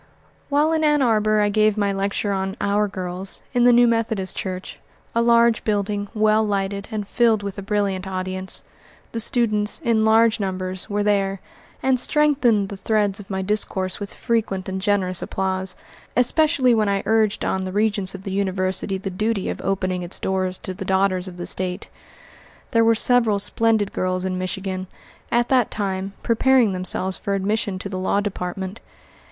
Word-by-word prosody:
While 295 +3 +2
in 315 -1 +1
Ann 295 -2 +3
Arbor 215 -2 +3
I 205 - +2
gave 215 0 +2
my 200 -1 +1
lecture 200 +1 -1
on 190 0 -2
"Our 205 +1 +1
Girls" 185 0 -6
in 245 -1 +3
the 245 - +7
new 240 0 +6
Methodist 225 -4 0
church 185 -1 -5 0.3
a 230 - +2
large 235 -1 +4
building, 205 -1 -1
well 215 0 +3
lighted, 200 -1 -2
and 210 -2 -4
filled 225 -3 +2
with 200 0 -5
a - - -4
brilliant 200 -2 -1
audience. 185 0 -3 0.5
The 230 - -3
students, 215 -3 0
in 230 -3 +2
large 225 +1 +4
numbers, 185 0 -4
were 205 0 0
there, 195 -2 +1 0.4
and 265 -1 +2
strengthened 265 -10 +2
the 200 - -6
threads 205 0 +1
of 200 - -11
my 190 -1 -2
discourse 190 -2 -1
with 205 -1 -6
frequent 215 -5 -1
and 190 0 -3
generous 190 -3 +1
applause; 190 -1 -2 0.4
especially 265 0 +4
when 215 -2 +2
I 200 0 0
urged 220 -1 +2
on 190 - 0
the 185 0 -4
Regents 205 -1 0
of 195 - -9
the 195 - -5
University 190 0 -1
the 195 0 -5
duty 210 +1 -1
of - - -7
opening 185 -2 -1
its 175 +1 -3
doors 185 -1 -1
to 185 - -4
the 190 +2 -6
daughters 190 -1 +1
of 180 -1 -9
the 175 - -5
State. 180 -1 -3 0.8
There 230 0 +4
were 225 0 +4
several 230 -2 +3
splendid 215 0 +1
girls 185 0 -1
in 185 -1 -2
Michigan, 185 0 -3 0.4
at 240 0 +2
that 255 -4 +3
time, 195 -1 -3
preparing 240 -2 +3
themselves 185 +1 -2
for 200 - -1
admission 200 0 -1
to 190 - -6
the 190 -2 -4
law 190 +2 +1
department. 190 0 -4
200 Hz, 175 wpm, -22 LUFS, 190-220 Hz, 0.8 s, the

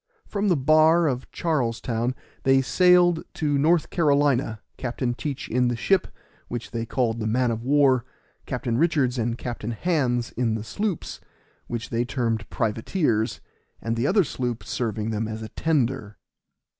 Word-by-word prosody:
From 205 0 -2
the 180 -5 +3
bar 155 +4 +5
of 130 -4 -2
Charles 135 -9 -1
Town 120 +1 -1 0.3
they 135 0 +4
sailed 180 +1 +4
to 150 -2 0
North 160 +3 +2
Carolina, 140 -8 +2 0.2
Captain 125 0 -2
Teach 140 +2 -5
in 125 +1 +1
the 120 - 0
ship, 185 +10 +2 0.4
which 120 -1 -6
they 115 -1 -3
called 115 -2 0
the 110 - -2
man 120 +2 +1
of 115 0 -3
war, 135 -2 +4 0.4
Captain 125 -2 -2
Richards 145 -6 +2
and 115 +1 -1
Captain 120 -3 -5
Hands 120 - 0
in 115 -3 0
the 110 - -4
sloops, 200 - -3 0.5
which 120 -1 -5
they 115 0 +1
termed 115 -3 -2
privateers, 110 - 0 0.4
and 115 0 -2
another 185 - +3
sloop 125 -5 -3
serving 110 -2 -2
them 110 0 -2
as 110 0 -5
a 110 - -7
tender. 135 -9 -1
125 Hz, 155 wpm, -25 LUFS, 115-150 Hz, 0.5 s, bar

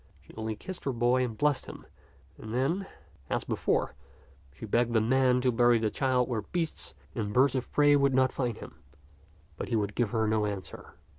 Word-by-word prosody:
She - - -18
only 110 0 -4
kissed 185 - -8
her 140 - +1
boy 120 +1 +2
and 115 -3 -4
blessed 145 -2 +1
him, - - -10 0.5
and 110 +1 -6
then, 165 +10 0 0.4
as - - -1
before, - - 0 0.6
she 70 - -9
begged 120 +2 +1
the 115 - +4
man 125 +2 +3
to 125 0 +2
bury 120 0 +4
the 110 -1 0
child 130 -2 +1
where 115 -4 -2
beasts 165 - -4 0.2
and 105 -4 -3
birds 130 +4 +4
of 130 -2 -3
prey 145 0 +5
would 140 -2 +3
not 130 0 +3
find 125 -4 -2
him; - - -11 0.8
but - - -4
he 120 - -1
would 105 -1 -1
give 120 -1 0
her 110 +1 0
no 110 -1 +1
answer. 100 -4 -7
125 Hz, 200 wpm, -29 LUFS, 110-135 Hz, 0.8 s, prey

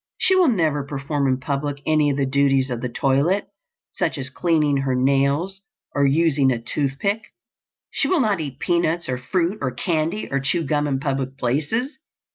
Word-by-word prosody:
She 375 - +4
will 370 -2 +5
never 160 - +1
perform 140 0 -2
in 130 -1 +1
public 140 +1 -3
any 155 -2 +3
of 140 - -1
the 140 - +1
duties 135 -1 +2
of 120 -1 -3
the 125 - -2
toilet, 140 +10 +1 0.5
such - - -1
as 130 -1 -4
cleaning 155 -3 +1
her 135 -1 0
nails 140 +8 +1 0.3
or 140 -1 +3
using 140 -2 +3
a 120 - 0
tooth 135 +3 -2
pick. 205 +2 0 0.7
She - - 0
will 365 - +2
not 210 -8 +1
eat 140 -5 -5
peanuts 170 +1 0
or 125 -1 -2
fruit 175 +9 -1
or 135 - 0
candy, 160 - -1
or 140 - +1
chew 150 +5 0
gum, 150 0 0
in 135 -2 -1
public 135 -1 -3
places. 155 - -1
145 Hz, 185 wpm, -22 LUFS, 135-170 Hz, 0.7 s, will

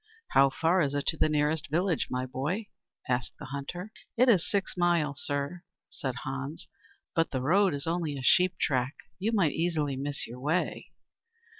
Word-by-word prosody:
"How 135 0 +6
far 165 +6 +2
is 145 -2 0
it 145 - -1
to 160 - -1
the 155 - +3
nearest 150 0 +1
village, 170 +2 +1
my 125 0 -1
boy?" 150 - -3 0.4
asked 125 -2 -1
the - - -8
hunter. 145 +9 -5 0.3
"It 250 +2 +5
is 190 -7 +4
six 200 -2 0
miles, 170 -5 +1
sir," 145 +4 -2 0.3
said - - -3
Hans. 65 0 -5 0.5
"But 165 - +2
the 130 -2 -2
road 185 +3 +4
is 140 - -4
only 165 -3 -1
a 130 - -6
sheep 180 +7 +4
track. 130 -1 +1 0.2
You 210 +4 0
might 190 -9 +3
easily 160 -4 0
miss 140 +1 -2
your 120 +2 -9
way." 155 +7 -1
150 Hz, 175 wpm, -29 LUFS, 140-175 Hz, 0.5 s, How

